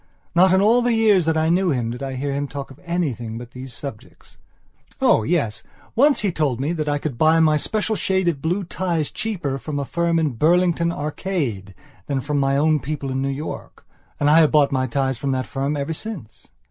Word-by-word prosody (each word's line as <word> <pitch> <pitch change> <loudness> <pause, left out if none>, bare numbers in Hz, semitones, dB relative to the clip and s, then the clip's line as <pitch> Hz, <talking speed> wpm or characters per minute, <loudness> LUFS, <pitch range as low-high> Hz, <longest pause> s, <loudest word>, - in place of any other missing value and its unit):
Not 185 +2 +5
in 190 +1 +4
all 230 +4 +4
the 240 -1 +2
years 210 -6 +4
that 160 0 +1
I 160 +1 +2
knew 180 +2 +2
him 120 -6 -1
did 125 - -7
I 135 -1 -4
hear 140 +2 -2
him 140 +1 -2
talk 140 -1 -7
of 135 - -15
anything 135 -11 -2
but 120 0 -9
these 130 0 -8
subjects. 120 -2 -10 0.6
Oh, - - +4
yes, 140 -5 -1 0.3
once 280 +4 +4
he 205 -3 +1
told 145 -7 -1
me 145 +5 -1
that 155 -3 -2
I 145 - +1
could 145 -5 -5
buy 160 +1 +5
my 155 -1 +4
special 215 +7 -1
shade 190 -3 0
of 155 -5 0
blue 180 +5 -1
ties 170 -3 -2
cheaper 170 -12 -3
from 150 0 -5
a 140 - -2
firm 170 +3 0
in 160 -3 +1
Burlington 170 +5 +2
Arcade 145 - -3 0.3
than 140 -2 -1
from 145 +2 -1
my 135 0 +2
own 155 +1 +3
people 140 +1 -4
in 130 0 -1
New 135 - -1
York. 140 +3 -6 0.3
And 145 - +2
I 155 +2 +6
have 155 -2 +5
bought 150 -2 +4
my 130 -1 0
ties 135 -1 -1
from 140 -1 -1
that 130 -1 -1
firm 140 +5 -2
ever 140 +3 -2
since. 160 - -8
150 Hz, 220 wpm, -22 LUFS, 135-170 Hz, 0.6 s, I